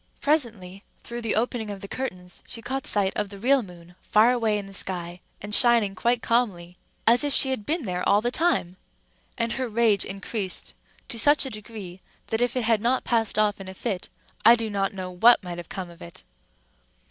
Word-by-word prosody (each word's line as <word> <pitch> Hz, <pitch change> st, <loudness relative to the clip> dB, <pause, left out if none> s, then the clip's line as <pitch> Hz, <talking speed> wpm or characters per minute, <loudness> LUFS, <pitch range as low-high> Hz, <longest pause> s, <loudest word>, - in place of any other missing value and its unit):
Presently, 220 Hz, -, -1 dB, 0.2 s
through 240 Hz, 0 st, -6 dB
the 225 Hz, -2 st, -1 dB
opening 225 Hz, -1 st, -1 dB
of 200 Hz, -1 st, -7 dB
the 200 Hz, -, -7 dB
curtains, 180 Hz, -8 st, -6 dB
she -, -, -6 dB
caught 270 Hz, +3 st, -3 dB
sight 200 Hz, -2 st, +2 dB
of 210 Hz, -1 st, -2 dB
the 200 Hz, -, -10 dB
real 260 Hz, +6 st, +3 dB
moon, 175 Hz, -4 st, -13 dB
far 220 Hz, +3 st, +4 dB
away 225 Hz, -4 st, +1 dB
in 205 Hz, -, -5 dB
the 195 Hz, -, -12 dB
sky, 175 Hz, -2 st, -3 dB, 0.2 s
and 205 Hz, 0 st, -3 dB
shining 235 Hz, -4 st, +5 dB
quite 235 Hz, +4 st, 0 dB
calmly, 190 Hz, -8 st, -1 dB, 0.3 s
as 235 Hz, +3 st, +5 dB
if 290 Hz, -1 st, -1 dB
she 265 Hz, -, +5 dB
had 215 Hz, -6 st, -4 dB
been 320 Hz, 0 st, +1 dB
there 180 Hz, -4 st, -3 dB
all 200 Hz, -, +5 dB
the 240 Hz, +3 st, -1 dB
time; 250 Hz, -, 0 dB, 0.6 s
and 230 Hz, 0 st, -1 dB
her 260 Hz, -2 st, -3 dB
rage 220 Hz, -2 st, +2 dB
increased 195 Hz, 0 st, -4 dB, 0.3 s
to 230 Hz, -, -3 dB
such 290 Hz, +3 st, +5 dB
a 265 Hz, -, -4 dB
degree 210 Hz, -4 st, -9 dB, 0.3 s
that 225 Hz, +1 st, 0 dB
if 245 Hz, 0 st, 0 dB
it 250 Hz, -, 0 dB
had 225 Hz, -2 st, +2 dB
not 245 Hz, +3 st, +1 dB
passed 225 Hz, -3 st, 0 dB
off 210 Hz, -2 st, +1 dB
in 190 Hz, -, -9 dB
a 190 Hz, -, -9 dB
fit, 185 Hz, 0 st, -4 dB, 0.3 s
I 230 Hz, +2 st, +8 dB
do 225 Hz, -2 st, -4 dB
not 195 Hz, -1 st, -1 dB
know 185 Hz, -1 st, -5 dB
what 225 Hz, +5 st, +5 dB
might 175 Hz, -1 st, -6 dB
have 170 Hz, -, -10 dB
come 185 Hz, -2 st, -6 dB
of 170 Hz, -, -17 dB
it. 85 Hz, -, -11 dB
215 Hz, 210 wpm, -25 LUFS, 190-240 Hz, 0.6 s, I